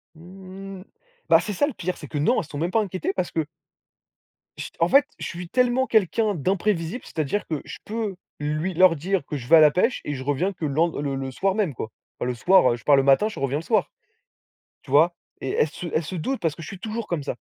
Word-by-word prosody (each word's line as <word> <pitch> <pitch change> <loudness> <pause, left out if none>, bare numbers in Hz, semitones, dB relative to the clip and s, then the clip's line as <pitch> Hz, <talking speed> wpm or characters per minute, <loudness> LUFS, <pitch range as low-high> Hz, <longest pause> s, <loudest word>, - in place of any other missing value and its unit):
Mmh. 190 +2 -10 0.5
Bah, - - +7
c'est 210 - -4
ça 290 +10 +2
le 290 - -4
pire, 185 -1 -4
c'est 150 - -9
que 145 - -5
non, 230 - +2
elles - - +1
se 155 - -14
sont 145 - -5
même 170 +4 -1
pas 225 - +3
inquiétées 190 -1 -3
parce 185 -2 -2
que, 160 -2 -1 1.1
ch - - -6
en 165 - +4
fait 275 0 +6
je - - -6
suis 175 0 -7
tellement 250 +3 +2
quelqu'un 215 0 +2
d'imprévisible, 185 - -1
c'est-à-dire 160 +6 -2
que 155 -3 -3
je - - -8
peux 215 -3 -3 0.2
lui 155 +5 -2
leur 180 0 +5
dire 180 +2 -1
que 150 - -4
je 120 - -9
vais 165 - +7
à - - +7
la 150 -1 +7
pêche 230 - +1
et 145 - -2
je 130 -2 -5
reviens 160 +8 0
que 165 - -5
le 140 - -2
lend 165 +2 +1
le 140 -2 -2
le 135 0 -4
soir 195 +7 0
même 200 -10 0
quoi. 110 - -5 0.3
Enfin - - -2
le 125 - -1
soir, 175 +1 +5
heu, - - -1
je 120 - -13
pars 145 - +5
le 135 - +4
matin 135 +10 +4
je - - -8
reviens 135 +1 0
le - - -8
soir, - - +1 0.9
tu - - -14
vois? 160 +5 +5 0.3
Et 135 - -3
elles 150 - +2
se 175 - -8
elles 155 - 0
se 185 - -6
doutent 260 +11 -2
parce 160 -3 0
que 165 - -10
je - - -8
suis 195 - -8
toujours 220 +3 -4
comme 170 -4 -2
ça. - - -3
170 Hz, 260 wpm, -24 LUFS, 150-195 Hz, 1.1 s, Bah